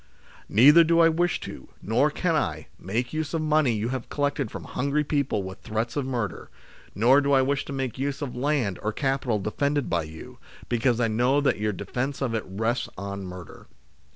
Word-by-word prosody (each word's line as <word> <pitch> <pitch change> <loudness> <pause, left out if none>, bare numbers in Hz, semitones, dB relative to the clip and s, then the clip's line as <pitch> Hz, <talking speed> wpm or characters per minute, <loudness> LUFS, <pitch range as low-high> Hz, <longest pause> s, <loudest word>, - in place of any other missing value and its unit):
Neither 145 +10 +7
do 165 +1 +3
I 165 0 +7
wish 175 +2 +1
to, - - -9
nor - - +2
can - - 0
I, - - -1
make 120 - -3
use 155 +1 -2
of 160 - -1
money 155 -5 +3
you 110 +2 -2
have 130 -2 -4
collected 145 -4 -1
from - - -7
hungry 140 +2 -1
people 140 -8 0
with 95 0 -8
threats 110 +2 -3
of 140 -3 -1
murder; 115 -8 -3 0.5
nor 125 +8 +5
do 140 0 +1
I 135 -1 +5
wish 140 +1 0
to - - -7
make 135 -3 -3
use 140 0 -2
of 130 - -5
land 125 -7 0
or 110 +1 -2
capital 135 -3 0
defended 140 +8 -1
by 85 -3 +1
you, 80 +1 -11 0.3
because 120 0 +1
I 120 - +2
know 125 +6 +2
that 140 - +1
your 105 0 0
defence 130 +7 -3
of 125 -4 -1
it 110 - -1
rests 110 +6 -1
on 100 0 -5
murder. 90 -1 -10
125 Hz, 200 wpm, -26 LUFS, 110-145 Hz, 0.5 s, Neither